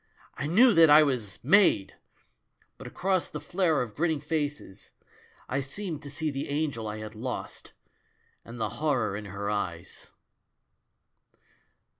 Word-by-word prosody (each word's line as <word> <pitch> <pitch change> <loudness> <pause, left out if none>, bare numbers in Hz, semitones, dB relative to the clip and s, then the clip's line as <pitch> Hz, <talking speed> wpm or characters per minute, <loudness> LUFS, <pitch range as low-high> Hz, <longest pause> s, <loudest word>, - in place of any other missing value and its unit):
I 145 - -4
knew 225 +9 +5
that 165 -3 +6
I 150 +1 +8
was 125 -9 -2
'made'! 170 - +4 0.9
But - - -8
across 190 -1 -1
the 150 - -6
flare 165 -1 +1
of 115 -4 -9
grinning 160 +1 0
faces, 150 -9 -4 0.5
I 135 - -1
seemed 155 +3 -5
to 145 - -9
see 150 +2 -3
the 140 0 -5
Angel 145 -6 -2
1 105 0 -4
had 110 0 -8
lost 120 +3 -6 0.7
and 115 +1 -10
the 110 -1 -1
horror 120 -10 0
in 105 +1 -6
her 100 +1 -4
eyes." 85 -5 -5
140 Hz, 140 wpm, -28 LUFS, 110-160 Hz, 0.9 s, I